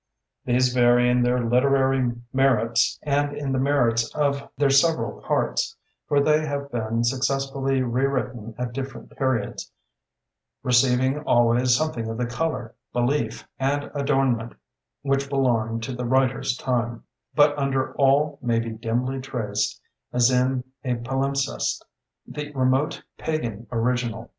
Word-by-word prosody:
These 125 0 +2
vary 120 0 +4
in 125 0 +3
their 125 0 +1
literary 130 0 +3 0.2
merits 120 -2 +2
and 145 0 0
in 140 -2 -3
the 130 - 0
merits 120 -4 +2
of 140 -2 0
their 140 0 +3
several 160 +4 +2
parts, - - -1 0.3
for 145 - +3
they 150 +2 +3
have 140 -2 -4
been 115 0 -1
successively 135 +1 0
rewritten 125 -3 -2
at 125 -1 -4
different 135 +1 -7
periods, 130 -6 -2 0.9
receiving 130 +2 +3
always 120 -2 +3
something 125 -6 -1
of 115 - -4
the 125 - -1
color, 120 -2 -3 0.2
belief, 125 +5 -1
and 140 +2 -1
adornment 135 -5 0 0.5
which 140 0 0
belonged 115 -5 0
to 130 - -4
the 125 0 -4
writer's 130 0 +1
time; 120 -2 -2 0.3
but 145 -1 +5
under 135 -2 -1
all 140 +2 +2
may 120 -2 +1
be 115 0 -2
dimly 120 +4 -2
traced, 115 -6 -2 0.3
as 125 +1 +3
in 125 0 +1 0.2
a 125 -2 0
palimpsest, 135 +3 -2 0.4
the 150 0 -6
remote 130 +2 +1 0.2
pagan 120 -9 -3
original. 120 -1 -1
130 Hz, 130 wpm, -24 LUFS, 120-140 Hz, 0.9 s, but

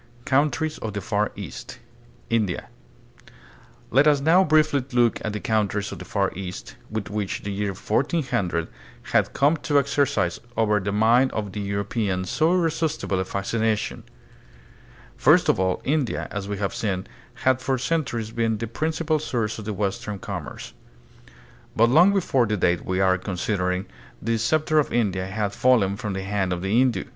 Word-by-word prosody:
Countries 150 +3 +1
of 110 -2 -5
the 100 - -2
Far 105 -1 +1
East. 100 - -8 0.5
India. 110 -6 0 1.2
Let 135 +5 +5
us 145 -2 +5
now 165 +7 +5
briefly 155 -4 +3
look 120 -2 +2
at 110 - -2
the 105 - -4
countries 105 -2 0
of - - -7
the - - -8
Far 100 -2 0
East, 90 -1 -7
which 110 -1 -3
by 105 -1 -2 0.2
the 100 - -3
year 100 0 -2
1400 105 - -1 0.5
had - - +3
come 145 +4 +3
to 145 -1 0
exercise 140 -10 +1 0.2
over 105 -2 +3
the 100 +1 -2
mind 115 +5 +4
of 105 -3 -3
the 105 - -5
European 100 -1 -2
so 155 - +1
irresistible 160 - 0
a 95 - -1
fascination. 110 +3 -1 1.2
First - - +5
of - - +3
all, 95 -1 0
India, 140 -4 0
as 100 -1 -4
we 100 - -2
have 100 -1 -2
seen, 95 -4 -2 0.3
had 130 0 +1
for 130 0 0
centuries 120 -6 -2
been 115 -1 0
the 115 - -3
prin 150 +8 -2
cipal 155 -1 0
source 115 -6 -2
of 110 - -8
the 110 - -2
western 100 +1 -3
commerce. 90 - -7 1.0
But 115 +1 +4
long 175 +8 +6
before 135 - +2
the 105 0 0
date 90 -1 +1
we 95 0 -1
are 95 -1 +3
considering, 90 -1 -1 0.3
the 115 +1 -1
scepter 155 +6 +2
of 150 - 0
India 95 -6 0
had 100 +1 -2
fallen 110 -7 +3
from 105 0 -4
the 95 0 -4
hand 95 -2 -1
of 90 0 -4
the 95 +3 0
Hindu. 125 0 +3
110 Hz, 170 wpm, -24 LUFS, 100-135 Hz, 1.2 s, long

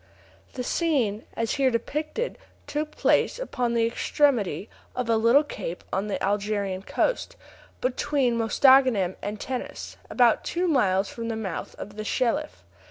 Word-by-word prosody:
The 250 - -4
scene, 245 - 0
as 230 -1 0
here 265 - +5
depicted, 305 - -3 0.3
took 300 +1 -2
place - - +2
upon 250 - -2
the 230 -1 +3
extremity 230 - +1 0.3
of 245 -2 -1
a - - +4
little 230 +6 +5
cape 180 - -6
on 195 +2 0
the 205 - -1
Algerian 200 -1 -1
coast, - - -1 0.5
between 255 0 +1
Mostaganem 230 -4 +4
and 205 +1 -4
Tenes, 255 +2 -5
about 240 -3 +3
two 360 +1 -1
miles 200 - +2
from 230 -1 -6
the 225 - -2
mouth 210 -5 -5
of 205 +1 -9
the 215 - -3
Shelif. 210 - -1
230 Hz, 145 wpm, -26 LUFS, 205-270 Hz, 0.5 s, here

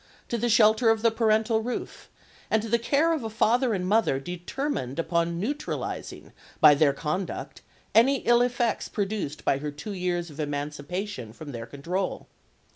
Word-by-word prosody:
to - - -2
the 235 +1 0
shelter 220 +1 +5
of 225 0 +2
the 230 - +5
parental 220 0 +2
roof, 245 +2 -5 0.4
and 220 -1 +2
to - - -4
the 235 +2 +3
care 295 +7 +2
of 310 -6 -2
a 225 - -3
father 235 +3 +2
and 185 -3 -1
mother 210 -10 +2
determined 175 - -4
upon 170 0 0
neutralising 285 +10 -4 0.3
by 150 - +8
their 145 0 +4
conduct 165 +6 -4 0.3
any 240 +6 +5
ill 240 0 +4
effects 245 -1 0
produced 200 -8 -3
by 135 - +2
her 150 +1 -3
two 145 +9 -7
years 175 -3 -2
of 150 - -13
emancipation 145 - -4
from 145 +5 -9
their 115 -2 -6
control. 175 +10 -3
200 Hz, 165 wpm, -26 LUFS, 150-230 Hz, 0.4 s, by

